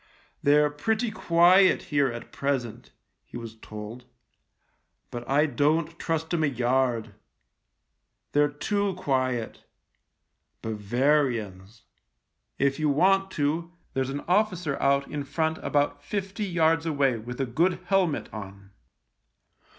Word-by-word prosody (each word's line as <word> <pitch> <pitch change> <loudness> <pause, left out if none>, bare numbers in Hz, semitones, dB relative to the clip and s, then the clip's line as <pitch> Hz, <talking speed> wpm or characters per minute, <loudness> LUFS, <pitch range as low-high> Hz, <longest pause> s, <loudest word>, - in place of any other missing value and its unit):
" - - -37
They're 150 +1 +4
pretty 220 +10 -1
quiet 180 0 +5
here 145 -1 +4
at 120 0 -8
present," 135 -5 -3 0.3
he - - -10
was 115 -1 -8
told, 110 +2 -9 0.5
" - - -46
but 120 0 -7
I 145 +3 +4
don't 155 +4 0
trust 160 0 -2
'em 165 -2 +1
a - - +3
yard. 120 -3 0 1.2
They're 145 0 +3
too 200 +6 -1
quiet. 130 -8 -1 1.0
Bavarians. 110 -2 -1 0.7
If 140 +1 +1
you 155 -1 +2
want 195 +6 +3
THE 150 - -3
LIEUTENANT 150 +4 +1
31 170 - -16
to, - - -30 0.2
there's 135 0 -1
an 140 +1 -4
officer 180 -6 +1
out 140 0 +2
in 145 -1 -4
front 160 +3 -1
about 145 0 0
fifty 200 +1 -3
yards 165 -2 +2
away 140 -5 +1
with 125 +3 -8
a 135 - +1
good 165 +10 +1
helmet 185 -5 +1
on. 100 -2 -9
145 Hz, 135 wpm, -26 LUFS, 120-165 Hz, 1.2 s, quiet